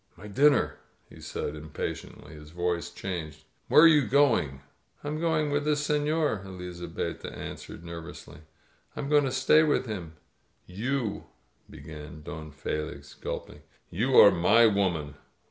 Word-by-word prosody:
"My 95 Hz, -, -12 dB
dinner!" 140 Hz, +5 st, +3 dB, 0.3 s
he -, -, -15 dB
said 75 Hz, -, -4 dB
impatiently. 75 Hz, -1 st, -7 dB
His 75 Hz, 0 st, -12 dB
voice 85 Hz, +1 st, -2 dB
changed. 80 Hz, -5 st, -6 dB, 0.2 s
"Where 150 Hz, -, +7 dB
are -, -, +10 dB
you 150 Hz, -7 st, +5 dB
going?" 110 Hz, -, +2 dB, 0.4 s
"I'm 150 Hz, +1 st, -3 dB
going 155 Hz, -3 st, +1 dB
with 145 Hz, 0 st, +1 dB
this 150 Hz, 0 st, 0 dB
senor," 150 Hz, -6 st, +1 dB
Elizabetta 90 Hz, -2 st, -6 dB
answered 80 Hz, -, -8 dB
nervously. 85 Hz, -2 st, -9 dB, 0.6 s
"I'm 140 Hz, -, -4 dB
going 145 Hz, -1 st, +4 dB
to 130 Hz, -, -1 dB
stay 130 Hz, +4 st, +4 dB
with 150 Hz, -4 st, +2 dB
him 90 Hz, -8 st, -6 dB, 0.3 s
" -, -, -42 dB, 0.2 s
"You 130 Hz, -5 st, -1 dB, 0.4 s
^" -, -, -16 dB
began 75 Hz, 0 st, -10 dB
Don 80 Hz, -1 st, -7 dB
Felix, 75 Hz, -1 st, -5 dB
gulping. -, -, -7 dB, 0.3 s
"You 120 Hz, +9 st, 0 dB
are 100 Hz, -, +10 dB
my 105 Hz, +7 st, +5 dB
woman. 90 Hz, -9 st, 0 dB
95 Hz, 145 wpm, -28 LUFS, -, 0.6 s, are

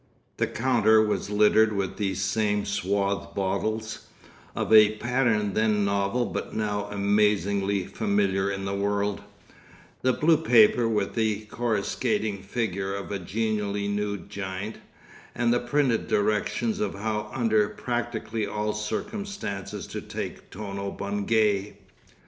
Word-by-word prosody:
The -, -, +1 dB
counter 115 Hz, -3 st, +3 dB
was 105 Hz, -1 st, 0 dB
littered 105 Hz, +1 st, +4 dB
with 100 Hz, -2 st, -2 dB
these 95 Hz, -2 st, -1 dB
same 105 Hz, 0 st, 0 dB
swathed 100 Hz, 0 st, -1 dB
bottles, 110 Hz, +3 st, -2 dB, 0.5 s
of -, -, 0 dB
a 110 Hz, -1 st, +7 dB
pattern 115 Hz, -4 st, +1 dB
then 105 Hz, -2 st, +2 dB
novel 100 Hz, +4 st, +1 dB
but -, -, -5 dB
now 105 Hz, -2 st, -1 dB
amazingly 100 Hz, -1 st, +1 dB
familiar 100 Hz, -2 st, 0 dB
in 95 Hz, -1 st, -3 dB
the 100 Hz, -, -2 dB
world, 100 Hz, 0 st, -1 dB, 0.8 s
the 130 Hz, -, +3 dB
blue 155 Hz, +5 st, +3 dB
paper 120 Hz, -5 st, +5 dB
with 105 Hz, -3 st, 0 dB
the 110 Hz, -2 st, 0 dB
coruscating 110 Hz, -2 st, -1 dB
figure 95 Hz, -2 st, -2 dB
of 100 Hz, 0 st, -6 dB
a 100 Hz, -, -2 dB
genially 105 Hz, +1 st, -1 dB
nude 100 Hz, -2 st, -2 dB
giant, 100 Hz, +2 st, -5 dB, 0.6 s
and 120 Hz, 0 st, +2 dB
the 120 Hz, -, +2 dB
printed 125 Hz, -1 st, +1 dB
directions 110 Hz, -, 0 dB
of 215 Hz, -, -1 dB
how 105 Hz, +1 st, -3 dB
under 110 Hz, -4 st, +2 dB
practically 115 Hz, -3 st, -3 dB
all 105 Hz, 0 st, -2 dB
circumstances 105 Hz, -, -4 dB
to -, -, -6 dB
take -, -, -6 dB
Tono 100 Hz, -1 st, -5 dB
Bungay. 105 Hz, 0 st, 0 dB
105 Hz, 125 wpm, -26 LUFS, 100-110 Hz, 0.8 s, a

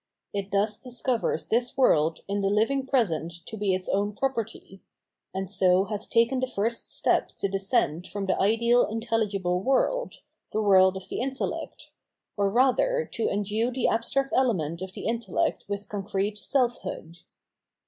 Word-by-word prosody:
It 200 Hz, -1 st, -3 dB
thus 205 Hz, +1 st, +1 dB
discovers 250 Hz, -1 st, -1 dB
this 245 Hz, +4 st, 0 dB
world 160 Hz, -, +3 dB
in 200 Hz, +1 st, -1 dB
the 195 Hz, -, +1 dB
hving 260 Hz, +6 st, +1 dB
present 170 Hz, -, 0 dB
to -, -, -7 dB
be 200 Hz, -3 st, +1 dB
its 185 Hz, 0 st, -5 dB
own 205 Hz, +1 st, 0 dB
property; 225 Hz, -7 st, -3 dB, 0.5 s
and 190 Hz, 0 st, -3 dB
so 185 Hz, -1 st, +3 dB
has 210 Hz, +1 st, -4 dB
taken 235 Hz, +3 st, +2 dB
the 260 Hz, -, 0 dB
first 230 Hz, -1 st, -2 dB
step -, -, +1 dB
to -, -, -1 dB
descend 195 Hz, -, 0 dB
from 200 Hz, -1 st, -4 dB
the 190 Hz, -, +1 dB
ideal 235 Hz, +4 st, +3 dB
in 225 Hz, +1 st, -3 dB
telhgible 200 Hz, -6 st, 0 dB
world, -, -, 0 dB, 0.3 s
the 215 Hz, -, +1 dB
world 190 Hz, -2 st, +5 dB
of 190 Hz, -, -9 dB
the -, -, -3 dB
intellect, 265 Hz, +1 st, -4 dB, 0.4 s
or 200 Hz, -1 st, +1 dB
rather 470 Hz, -, +2 dB
to 230 Hz, -, 0 dB
endue 210 Hz, +3 st, 0 dB
the 255 Hz, -1 st, 0 dB
abstract 270 Hz, +4 st, 0 dB
element 175 Hz, -, +1 dB
of 190 Hz, 0 st, -6 dB
the -, -, -7 dB
intellect 230 Hz, -4 st, -1 dB
with 200 Hz, 0 st, -4 dB
concrete 205 Hz, 0 st, -2 dB
self 245 Hz, 0 st, 0 dB
hood. 170 Hz, -3 st, -7 dB
210 Hz, 160 wpm, -27 LUFS, 195-245 Hz, 0.5 s, world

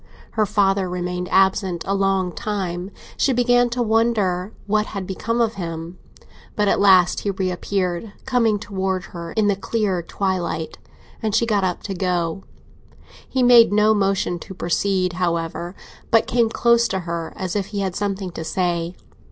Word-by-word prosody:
Her 215 Hz, -2 st, +1 dB
father 195 Hz, -2 st, +2 dB
remained 180 Hz, 0 st, -3 dB
absent 190 Hz, -2 st, +2 dB
a 195 Hz, -, 0 dB
long 195 Hz, -2 st, +1 dB
time; 185 Hz, -3 st, -3 dB, 0.3 s
she 270 Hz, -, +2 dB
began 245 Hz, 0 st, +3 dB
to 240 Hz, +1 st, -1 dB
wonder 215 Hz, -4 st, +1 dB
what 210 Hz, +1 st, +1 dB
had 195 Hz, -3 st, -5 dB
become 230 Hz, +5 st, -2 dB
of 230 Hz, -2 st, +2 dB
him. 165 Hz, +1 st, -6 dB, 0.6 s
But 210 Hz, -1 st, +1 dB
at -, -, +2 dB
last 190 Hz, -3 st, +5 dB
he 205 Hz, -, -3 dB
reappeared, 185 Hz, 0 st, -2 dB
coming 235 Hz, -5 st, +2 dB
towards 190 Hz, -2 st, -3 dB
her 170 Hz, -1 st, -6 dB
in 220 Hz, -, +2 dB
the 205 Hz, -1 st, +3 dB
clear 195 Hz, -2 st, -1 dB
twilight, 175 Hz, -3 st, -3 dB, 0.4 s
and 215 Hz, -2 st, 0 dB
she 235 Hz, -, +3 dB
got 210 Hz, -4 st, +1 dB
up, 180 Hz, -2 st, -1 dB
to 200 Hz, -, -4 dB
go 180 Hz, -1 st, -1 dB
on. -, -, -26 dB, 0.9 s
He 260 Hz, -1 st, +1 dB
made 240 Hz, -3 st, +7 dB
no 210 Hz, +1 st, +4 dB
motion 195 Hz, -3 st, 0 dB
to 190 Hz, -, -10 dB
proceed, 185 Hz, +1 st, 0 dB
however, 170 Hz, +1 st, -2 dB, 0.3 s
but 225 Hz, -, +4 dB
came 235 Hz, -1 st, +2 dB
close 235 Hz, 0 st, +3 dB
to 190 Hz, -1 st, -2 dB
her, 170 Hz, -1 st, -4 dB
as 185 Hz, 0 st, -4 dB
if 200 Hz, -2 st, -1 dB
he 205 Hz, -1 st, -3 dB
had 190 Hz, -2 st, -2 dB
something 195 Hz, -2 st, -2 dB
to 165 Hz, -, -6 dB
say. 175 Hz, 0 st, -1 dB
195 Hz, 170 wpm, -21 LUFS, 180-215 Hz, 0.9 s, made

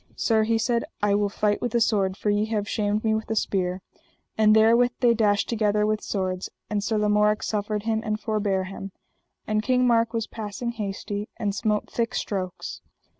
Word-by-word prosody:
Sir, 220 Hz, -2 st, +2 dB
he 225 Hz, +1 st, +2 dB
said, 235 Hz, +1 st, +1 dB, 0.2 s
I 205 Hz, -1 st, +3 dB
will 205 Hz, 0 st, +2 dB
fight 210 Hz, 0 st, 0 dB
with 240 Hz, -1 st, -2 dB
a -, -, +4 dB
sword, 200 Hz, -4 st, +1 dB
for 210 Hz, -, 0 dB
ye 205 Hz, +1 st, +1 dB
have 215 Hz, -2 st, -2 dB
shamed 210 Hz, -1 st, 0 dB
me 220 Hz, -1 st, +2 dB
with 220 Hz, 0 st, -2 dB
a 220 Hz, -, 0 dB
spear; 185 Hz, -3 st, -1 dB, 0.5 s
and 215 Hz, 0 st, +5 dB
therewith 230 Hz, +3 st, +5 dB
they 240 Hz, -2 st, +4 dB
dashed 210 Hz, -3 st, +2 dB
together 210 Hz, -2 st, +1 dB
with 215 Hz, 0 st, 0 dB
swords, 185 Hz, -2 st, -3 dB, 0.2 s
and 205 Hz, -1 st, 0 dB
Sir 220 Hz, +1 st, 0 dB
Lamorak 210 Hz, 0 st, +2 dB
suffered 210 Hz, 0 st, -2 dB
him 220 Hz, 0 st, 0 dB
and 215 Hz, -1 st, -2 dB
forbare 205 Hz, -3 st, 0 dB
him. 195 Hz, 0 st, -8 dB, 0.5 s
And 215 Hz, 0 st, 0 dB
King 250 Hz, +2 st, +2 dB
Mark 230 Hz, -1 st, +3 dB
was 225 Hz, -2 st, -1 dB
passing 220 Hz, +2 st, -5 dB
hasty, 205 Hz, -1 st, -4 dB
and 205 Hz, -3 st, -1 dB
smote 210 Hz, 0 st, 0 dB
thick 230 Hz, -1 st, -2 dB
strokes. 185 Hz, -3 st, -4 dB
215 Hz, 190 wpm, -25 LUFS, 205-225 Hz, 0.5 s, and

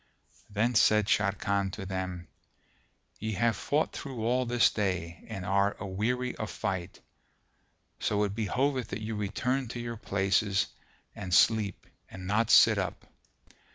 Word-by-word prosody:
Then 110 Hz, +4 st, +1 dB
said 105 Hz, -1 st, +4 dB
Sharrkan 100 Hz, -1 st, +1 dB
to 100 Hz, -, -6 dB
them, 95 Hz, -2 st, -4 dB, 0.9 s
"Ye 110 Hz, 0 st, -3 dB
have 115 Hz, +3 st, +2 dB
fought 150 Hz, +2 st, 0 dB
through 125 Hz, -5 st, -5 dB
all 125 Hz, +1 st, +1 dB
this 120 Hz, 0 st, +4 dB
day 90 Hz, -5 st, -2 dB
and 95 Hz, -5 st, -6 dB
are 100 Hz, +1 st, +1 dB
aweary 115 Hz, +6 st, -2 dB
of 110 Hz, -, -4 dB
fight; 95 Hz, -3 st, -4 dB, 1.0 s
so 105 Hz, 0 st, +1 dB
it 100 Hz, -1 st, -1 dB
behoveth 125 Hz, +5 st, 0 dB
that 105 Hz, +2 st, -5 dB
you 110 Hz, 0 st, -3 dB
return 125 Hz, +6 st, -1 dB
to 120 Hz, +2 st, -6 dB
your 120 Hz, -1 st, -5 dB
places 100 Hz, -1 st, +1 dB, 0.5 s
and 95 Hz, -3 st, -7 dB
sleep 105 Hz, 0 st, +3 dB, 0.2 s
and 95 Hz, -1 st, -9 dB
not 105 Hz, +4 st, +1 dB
sit -, -, +7 dB
up." -, -, -4 dB
105 Hz, 140 wpm, -29 LUFS, 95-115 Hz, 1.0 s, sit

